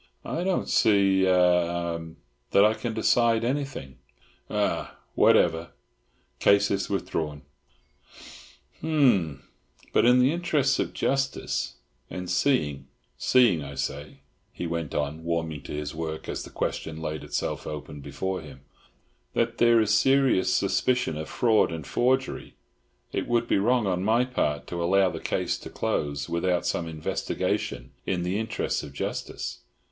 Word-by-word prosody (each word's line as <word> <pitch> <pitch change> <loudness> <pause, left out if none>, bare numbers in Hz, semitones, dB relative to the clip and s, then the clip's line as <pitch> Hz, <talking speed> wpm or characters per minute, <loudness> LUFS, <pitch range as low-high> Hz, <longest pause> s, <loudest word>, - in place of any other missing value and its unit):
"I 170 - -2
don't 190 0 0
see—eh—um—that 90 - +2
I 110 - +4
can 115 0 -4
decide 115 0 +3
anything—ah—whatever. 85 - -1 0.7
Case 100 0 +4
is 100 -1 -1
withdrawn. 80 -6 -3 1.4
Ha, - - -4
hum. 115 - +2 0.5
But - - +4
in 125 +1 +6
the 125 +2 +4
interests 155 -6 +1
of - - -1
justice, 135 0 -1 0.3
and 90 -1 -5
seeing—seeing, 80 - +1
I 70 0 -8
say," 70 +2 -5 0.3
he - - -5
went 85 -3 -3
on, 75 +2 -2
warming 80 -3 -2
to - - -7
his 75 0 -4
work 80 0 -5
as - - -3
the - - -9
question 80 -1 -3
laid 80 -1 -4
itself - - -3
open 75 -1 -7
before 95 +6 -4
him, 70 -4 -12 0.7
"that 115 0 0
there 120 -1 +6
is 110 -1 +2
serious 135 -6 +3
suspicion 125 -10 +1
of 80 0 -5
fraud 115 -7 +3
and 80 -3 -5
forgery, 130 +2 0 0.6
it - - -2
would 120 -1 +1
be - - +2
wrong 120 +2 +2
on 90 -1 0
my 115 +4 +3
part 75 - -1
to 85 -1 -4
allow 95 +2 +3
the - - -6
case - - -1
to - - -9
close 70 -1 -2
without 85 +1 0
some 85 - -1
investigation 80 -1 -3 0.2
in 90 -2 0
the 90 +4 -1
interests 110 +1 -2
of 70 -3 -9
justice. 70 - -4
90 Hz, 135 wpm, -26 LUFS, 80-115 Hz, 1.4 s, in